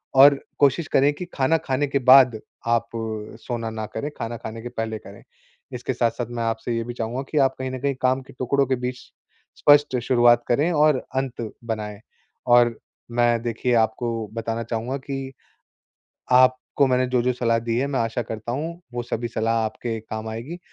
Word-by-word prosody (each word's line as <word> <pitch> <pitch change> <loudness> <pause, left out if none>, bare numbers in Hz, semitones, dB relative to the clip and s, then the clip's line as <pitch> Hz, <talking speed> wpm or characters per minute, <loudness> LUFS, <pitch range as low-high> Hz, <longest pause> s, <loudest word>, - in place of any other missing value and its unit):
और 140 +1 +8 0.2
कोशिश 145 +2 +3
करें 140 +2 +4
कि 180 +5 -6
खाना 140 +4 +3
खाने 135 +2 +1
के 140 0 0
बाद 130 -3 +7 0.3
आप 115 0 +2 0.5
सोना 115 -2 -4
ना 110 -1 -4
करे, 145 +7 -2
खाना 115 0 -4
खाने 110 +1 -7
के 120 - -6
पहले 110 -1 -3
करें। 100 0 -13 0.5
इसके 125 +1 -3
साथ-साथ 120 0 -1
मैं 120 -1 -3
आपसे 115 +1 -2
ये 115 - -1
भी 120 - -5
चाहूँगा 120 +2 -3
कि 155 - -1
आप 135 -1 +3
कहीं 130 0 -3
न 130 - -5
कहीं 140 +1 -1
काम 130 +1 +2
के 130 - -15
टुकड़ों 140 +2 +2
के 130 - +1
बीच 125 0 -4 0.6
स्पष्ट 145 -3 +5
शुरुआत 120 -2 +4
करें 145 +8 +2
और 150 -2 +4 0.2
अंत 125 -4 -3
बनाए। 105 -3 -4 0.5
और 120 -1 +5 0.4
मैं 120 -1 +3
देखिए 120 +1 -1
आपको 115 0 -4
बताना 115 0 -3
चाहूँगा 115 +4 -3
कि 135 0 -5 1.0
आपको 130 +2 +4
मैंने 130 0 +2
जो-जो 125 0 +1
सलाह 115 -2 +1
दी 115 0 -2
है, 135 - +1
मैं 140 -2 -1
आशा 115 +1 -1
करता 110 +1 -5
हूँ, 165 +6 -4
वो 120 - -2
सभी 120 0 -3
सलाह 115 0 0
आपके 115 +1 -3
काम 110 0 -6
आएगी 125 +11 -6
120 Hz, 180 wpm, -23 LUFS, 115-135 Hz, 1.0 s, और